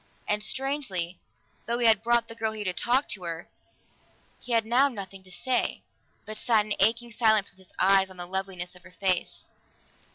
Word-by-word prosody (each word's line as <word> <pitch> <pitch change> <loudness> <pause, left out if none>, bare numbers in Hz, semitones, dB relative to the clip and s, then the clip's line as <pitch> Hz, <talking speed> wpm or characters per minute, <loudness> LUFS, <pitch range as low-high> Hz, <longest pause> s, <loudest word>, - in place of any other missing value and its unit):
And 210 0 +1
strangely, 215 - -1 0.5
though 235 +1 0
he 240 - +1
had 220 -2 +6
brought 235 0 +2
the 230 - -8
girl 220 -1 -2
here 215 -1 -5
to 185 - -1
talk 250 +9 +2
to 200 - -3
her, 170 -1 -5 0.9
he 245 - -3
had 225 -1 +4
now 250 +5 +4
nothing 195 -6 -7
to 185 0 -16
say, 255 +7 -1 0.4
but 215 0 -6
sat 225 -4 +3
in 215 - -1
aching 235 +2 +2
silence 220 -3 +3
with - - -27
his 185 - -14
eyes 195 0 +5
on 185 - -13
the 175 - -6
loveliness 185 -1 -3
of 180 - -15
her 185 0 -17
face. 185 -3 0
210 Hz, 195 wpm, -27 LUFS, 185-235 Hz, 0.9 s, had